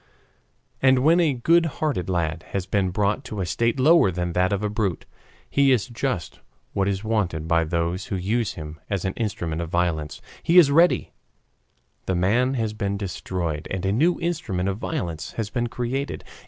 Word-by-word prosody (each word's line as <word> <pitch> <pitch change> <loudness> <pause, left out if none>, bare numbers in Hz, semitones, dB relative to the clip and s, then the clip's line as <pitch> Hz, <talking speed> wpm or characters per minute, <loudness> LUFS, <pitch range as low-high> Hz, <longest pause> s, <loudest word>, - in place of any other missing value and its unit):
And 130 -1 +4
when 165 +4 +5
a 155 -6 +2
good 165 +7 +3
hearted 145 - -1
lad 85 -2 -1
has 95 -2 -1
been 100 -2 0
brought 105 +7 0
to 105 -4 -6
a 95 - -1
state 115 +8 0
lower 155 - +6
than 90 -1 -2
that 90 +1 +2
of 100 +1 -1
a - - +1
brute, 105 -6 -2 0.4
he 140 -1 +3
is 120 -5 +3
just 125 - -3 0.3
what 95 -1 +1
is 100 0 -1
wanted 95 -8 -1
by 85 0 +2
those 85 +3 -1
who - - -2
use 105 +3 -1
him 75 0 -8
as 100 -3 -2
an 95 - -1
instrument 85 -8 -3
of 85 - -4
violence. 80 -3 -1 0.2
He 170 +2 +3
is 155 -6 +8
ready; 170 +4 +4 1.0
the 95 - +1
man 120 +9 +2
has 110 -3 -1
been 100 -2 -2
destroyed 90 -5 -4
and 95 0 -3
a 95 - +2
new 165 +10 +2
instrument 120 - -1
of 95 +2 -3
violence 85 - -4
has 110 -2 -4
been 120 +1 -1
created. 125 +4 -3
100 Hz, 185 wpm, -24 LUFS, 90-125 Hz, 1.0 s, is